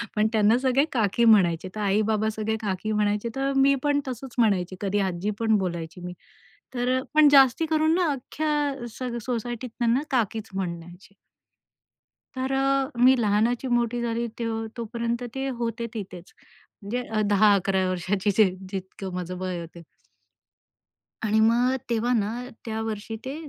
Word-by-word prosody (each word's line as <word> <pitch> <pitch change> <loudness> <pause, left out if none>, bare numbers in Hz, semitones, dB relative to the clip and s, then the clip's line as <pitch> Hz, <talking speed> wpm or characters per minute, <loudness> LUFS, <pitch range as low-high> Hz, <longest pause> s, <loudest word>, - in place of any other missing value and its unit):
पण 210 0 +2
अ, - - +2
त्यांना 220 +2 +4
सगळे 265 +2 +2
काकी 230 -1 +2
म्हणायचे 185 -5 +4
तर 215 - -4
आई-बाबा 215 +2 +1
सगळे 220 0 -1
काकी 205 +1 -2
म्हणायचे, 210 +1 0
तर 270 +1 0
मी 275 +1 +5
पण 290 -1 +2
तसंच 255 0 -7
म्हणायची. 190 -5 +2
कधी 205 0 0
आजी 180 +4 -3
पण 220 -1 +3
बोलायची 170 -2 -4
मी. 180 - -5 0.6
तर 250 +1 +1
अ, - - -3
पण 305 -1 +7
जास्ती 270 +3 +6
करून 315 0 +2
ना 350 -4 +2
अख्ख्या 285 -1 -2
सग 245 -2 -3
सोसायटीत 240 +1 -4
त्यांना 235 +2 +2
काकीच 225 -3 -1
म्हणायचे. 175 0 -6 1.2
तर 260 +1 -2
अ, 270 0 +1 0.2
मी 260 +1 +7
लहानाची 225 +4 +1
मोठी 240 0 +1
झाली 235 0 -1
ते 235 - -2 0.3
तोपर्यंत 235 +1 -3
ते 270 0 -2
होते 230 0 -2
तिथेच. 185 -4 -8 0.5
म्हणजे 235 +5 -3
अ, 220 -1 -1
10-11 195 -2 +3
वर्षांची 190 +3 -1
जे 215 -4 +5 0.2
जितकं 190 0 -6
माझं 180 0 -4
वय 185 -1 -3
होतं. 170 +1 -10 1.4
आणि 220 0 +2
मग 240 +4 +3
तेव्हा 235 +1 +1
ना 215 -3 +1 0.3
त्यावर्षी 220 -1 -4
ते 265 +1 -4
225 Hz, 150 wpm, -25 LUFS, 200-250 Hz, 1.4 s, पण